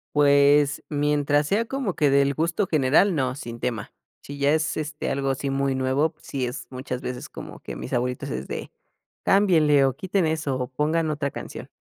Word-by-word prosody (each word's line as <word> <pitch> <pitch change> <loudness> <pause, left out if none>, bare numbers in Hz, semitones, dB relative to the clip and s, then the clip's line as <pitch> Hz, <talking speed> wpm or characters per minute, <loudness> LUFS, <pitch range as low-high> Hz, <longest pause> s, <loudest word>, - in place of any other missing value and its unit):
Pues, 145 0 +4
mientras 145 0 +1
sea 210 +7 +1
como 245 -6 -3
que 145 -3 +2
del 140 0 +3
gusto 170 +6 0
general, 155 +5 +3
no, 130 -4 0
sin 120 -4 -8
tema. 115 -4 -3 0.3
Si 145 - -9
ya 140 +1 +3
es, 155 0 0
este, 150 -1 -3
algo 135 0 -1
así 135 +1 -2
muy 135 0 0
nuevo, 130 +4 +1
pues 155 -1 -22
sí, 135 -2 -2
es 125 +3 -5
muchas 130 -1 -5
veces 125 -2 -6
como - - -9
que - - -7
mis 65 - -5
abuelitos 125 +1 -1
es 65 +2 -4
de: - - -6 0.5
"Cámbienle 160 -8 +4
o 130 - 0
quiten 190 -2 0
eso 155 -4 -1
o 125 -1 -3
pongan 155 +4 0
otra 145 -2 -2
canción". - - -8
145 Hz, 195 wpm, -24 LUFS, 130-155 Hz, 0.5 s, Pues